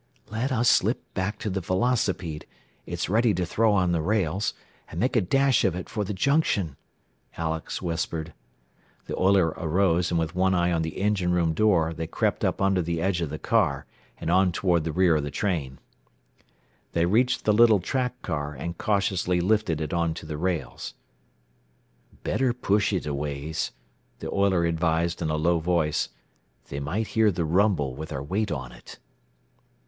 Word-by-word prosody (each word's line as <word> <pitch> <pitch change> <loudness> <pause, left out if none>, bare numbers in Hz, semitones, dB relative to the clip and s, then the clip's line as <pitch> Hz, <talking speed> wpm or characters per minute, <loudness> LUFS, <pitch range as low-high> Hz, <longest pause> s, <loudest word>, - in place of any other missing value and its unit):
"Let 115 +5 -1
us 120 -1 +2
slip - - +3
back 95 +3 -2
to 105 - -2
the 95 0 -2
velocipede 95 -5 -1 0.4
it's - - -3
ready 110 +3 +3
to 90 0 0
throw 110 +6 +2
on 95 -3 +2
the 85 -2 +1
rails 95 +1 0 0.3
and 80 - -6
make 125 +5 +1
a 115 - +4
dash 135 +7 +3
of - - +2
it 90 - -6
for 105 -2 -2
the 100 - -4
junction," 105 - +1 0.6
Alex 80 +2 -3
whispered. 80 -1 -3 0.7
The - - -4
oiler 95 -3 +4
arose, 85 +1 +1
and 85 - +1
with 80 +1 -2
one 95 +1 +2
eye 85 0 +2
on 85 -1 +1
the 80 -1 -4
engine 95 -3 +1
room 85 -2 +2
door 85 -4 +2
they 80 0 -4
crept - - -1
up - - 0
under 95 -1 +3
the 85 0 -2
edge 90 0 0
of 80 - -2
the 75 - -5
car, 70 -2 +1 0.3
and 80 - -2
on 95 0 +4
toward 85 -2 +1
the 80 - -1
rear 85 -1 +3
of - - 0
the 75 - -3
train. 75 -8 -2 1.2
They 85 0 +2
reached 115 +8 +2
the 105 - +4
little 110 -1 +6
track 125 +5 -2
car, 75 -3 -3
and 85 +5 -6
cautiously 95 -3 +1
lifted 95 -3 +1
it 80 +1 -3
onto 85 -1 -1
the 75 -1 -5
rails. 90 -1 -3 1.3
"Better 130 -2 +1
push 105 -3 +1
it 95 - -1
a 75 - -2
ways," 70 +2 -3 0.5
the - - -6
oiler 95 -3 +2
advised 85 0 0
in 80 - -1
a 75 - 0
low 85 +2 +2
voice. 80 -2 0 0.6
"They 70 - -4
might 95 +11 -2
hear 110 -1 +3
the 85 -3 -1
rumble, 85 -5 +2
with 80 +4 -7
our 70 - -4
weight 100 +8 -1
on 65 -2 -4
it." - - -13
90 Hz, 180 wpm, -26 LUFS, 80-100 Hz, 1.3 s, little